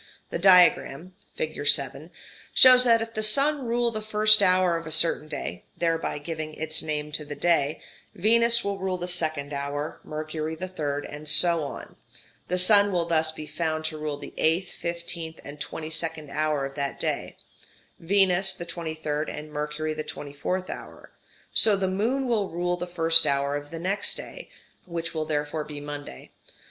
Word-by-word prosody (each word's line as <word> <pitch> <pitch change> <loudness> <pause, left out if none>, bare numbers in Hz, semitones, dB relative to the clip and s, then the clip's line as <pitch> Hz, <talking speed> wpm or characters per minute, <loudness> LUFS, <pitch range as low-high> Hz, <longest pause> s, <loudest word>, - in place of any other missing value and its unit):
The - - -3
diagram 180 -2 +4 0.2
(fig. 475 - -4
7) - - +1 0.5
shows 255 -1 +8
that 230 -2 +4
if 225 0 -10
the 215 - -3
Sun 275 +5 +2
rule 235 0 +1
the 215 -1 -5
first 215 0 +6
hour 185 -1 +3
of 165 -1 -5
a - - -7
certain 155 -1 +4
day 135 - -6
(thereby 165 -3 -1
giving 155 0 -6
its 155 0 -3
name 150 -1 -4
to 150 0 +3
the 145 0 -7
day) 160 -3 +1 0.4
Venus 235 +4 +3
will 200 -1 -3
rule 190 -1 -2
the 175 0 -5
second 155 -5 -1
hour, 145 +2 -4
Mercury 155 +1 -5
the 185 +3 -6
third, 145 -5 -4
and 150 +1 -7
so 170 0 +4
on; 140 - -8 0.5
the 180 - -1
Sun 200 +2 +5
will 175 -2 0
thus 160 -1 +1
be 155 -1 -9
found 155 +1 -3
to 155 0 -3
rule 150 -1 -4
the - - -10
eighth, 170 +3 +1
fifteenth, 170 -1 -6
and 145 +1 -10
twenty 160 0 -6
second 160 -2 -5
hour 150 -2 -1
of 135 - -7
that 140 -1 -4
day, - - -3 0.6
Venus 190 +1 +3
the 175 - -7
twenty 165 -2 -6
third, 155 -1 -3
and 150 0 -8
Mercury 150 +1 -3
the 155 - -4
twenty 145 -2 -8
fourth 185 +6 -3
hour; - - -10 0.4
so 215 -2 +5
the 190 -1 -1
Moon 225 +9 -1
will 215 -5 0
rule 175 +1 -1
the 180 0 -6
first 165 -2 +6
hour 140 0 0
of 145 0 -6
the 165 - -7
next 190 +4 -2
day, - - -9 0.4
which 170 -1 -4
will 155 -1 -2
therefore 150 0 -2
be 150 -1 -8
Monday. 145 - -9
165 Hz, 180 wpm, -25 LUFS, 150-185 Hz, 0.6 s, shows